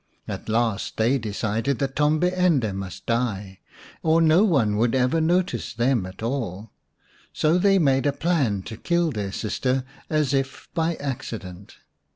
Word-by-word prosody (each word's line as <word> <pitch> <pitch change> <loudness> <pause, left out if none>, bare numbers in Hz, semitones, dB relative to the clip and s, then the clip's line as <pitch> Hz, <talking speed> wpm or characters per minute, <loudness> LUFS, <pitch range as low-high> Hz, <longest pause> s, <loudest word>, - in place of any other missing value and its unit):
At - - -6
last 110 -2 0
they 120 +5 +2
decided 110 +4 -1
that 135 -1 -2
Tombi 155 +5 +2
ende 160 - +2
must 95 -1 -7
die, 105 -5 -2 0.4
or 160 0 +3
no 165 +4 +5
one 130 - +2
would 115 +3 +2
ever 130 +5 +2
notice 170 - 0
them 120 -4 +1
at 95 +4 -10
all. 115 -5 -3 0.6
So 160 +3 +2
they 195 +1 +4
made 135 -5 +3
a - - +3
plan 140 - 0
to 110 +2 -8
kill 170 +2 +1
their 105 -5 -3
sister 125 +5 -1 0.3
as 150 -4 +1
if 135 -1 -2
by 165 0 0
accident. 105 - -6
130 Hz, 155 wpm, -24 LUFS, 110-155 Hz, 0.6 s, no